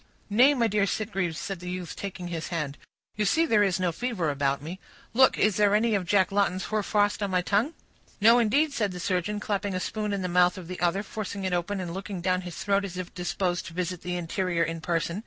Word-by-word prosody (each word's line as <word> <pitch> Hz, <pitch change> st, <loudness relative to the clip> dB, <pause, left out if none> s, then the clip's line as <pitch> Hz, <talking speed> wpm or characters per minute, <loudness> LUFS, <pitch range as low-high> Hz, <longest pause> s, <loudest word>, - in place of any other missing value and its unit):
"Nay, 255 Hz, +7 st, +6 dB
my 240 Hz, -3 st, +2 dB
dear 210 Hz, -2 st, +2 dB
Sitgreaves," 195 Hz, -6 st, -2 dB
said 195 Hz, 0 st, -4 dB
the 180 Hz, 0 st, -6 dB
youth, 180 Hz, -2 st, -5 dB
taking 185 Hz, -3 st, -6 dB
his 165 Hz, -2 st, -4 dB
hand, 150 Hz, -5 st, -3 dB, 0.4 s
"you 210 Hz, -, +1 dB
see 320 Hz, +11 st, +3 dB
there 220 Hz, -9 st, +3 dB
is 190 Hz, -3 st, +2 dB
no 180 Hz, -2 st, +1 dB
fever 185 Hz, -6 st, -1 dB
about 140 Hz, -1 st, 0 dB
me; 165 Hz, +6 st, -7 dB, 0.3 s
look, 260 Hz, +3 st, +5 dB
is 210 Hz, -2 st, +2 dB
there 205 Hz, -1 st, +4 dB
any 225 Hz, +1 st, +2 dB
of 190 Hz, -4 st, 0 dB
Jack 190 Hz, -1 st, +3 dB
Lawton's 195 Hz, -2 st, +1 dB
hoarfrost 210 Hz, -1 st, +1 dB
on 200 Hz, -, 0 dB
my 180 Hz, -1 st, +1 dB
tongue?" 215 Hz, -, +1 dB, 0.4 s
"No, 230 Hz, +3 st, +6 dB
indeed," 280 Hz, +7 st, +2 dB
said 210 Hz, -7 st, -1 dB
the 180 Hz, -, -6 dB
surgeon, 185 Hz, +3 st, -1 dB
clapping 205 Hz, -2 st, -2 dB
a -, -, 0 dB
spoon 210 Hz, +2 st, -3 dB
in 200 Hz, -2 st, -2 dB
the -, -, 0 dB
mouth 180 Hz, +1 st, +3 dB
of 180 Hz, -3 st, -8 dB
the 180 Hz, 0 st, -6 dB
other, 175 Hz, +3 st, +1 dB
forcing 205 Hz, -1 st, -5 dB
it 185 Hz, -, -1 dB
open, 180 Hz, +3 st, -1 dB
and 175 Hz, -2 st, -4 dB
looking 195 Hz, 0 st, -5 dB
down 185 Hz, +1 st, +1 dB
his 175 Hz, -3 st, -7 dB
throat 200 Hz, -1 st, +2 dB
as 185 Hz, -2 st, -6 dB
if 185 Hz, -1 st, -6 dB
disposed 180 Hz, 0 st, -2 dB
to 170 Hz, -, -9 dB
visit 180 Hz, 0 st, -3 dB
the 180 Hz, 0 st, -3 dB
interior 175 Hz, 0 st, 0 dB
in 165 Hz, 0 st, -3 dB
person. 170 Hz, +2 st, -1 dB
190 Hz, 235 wpm, -27 LUFS, 175-210 Hz, 0.4 s, Nay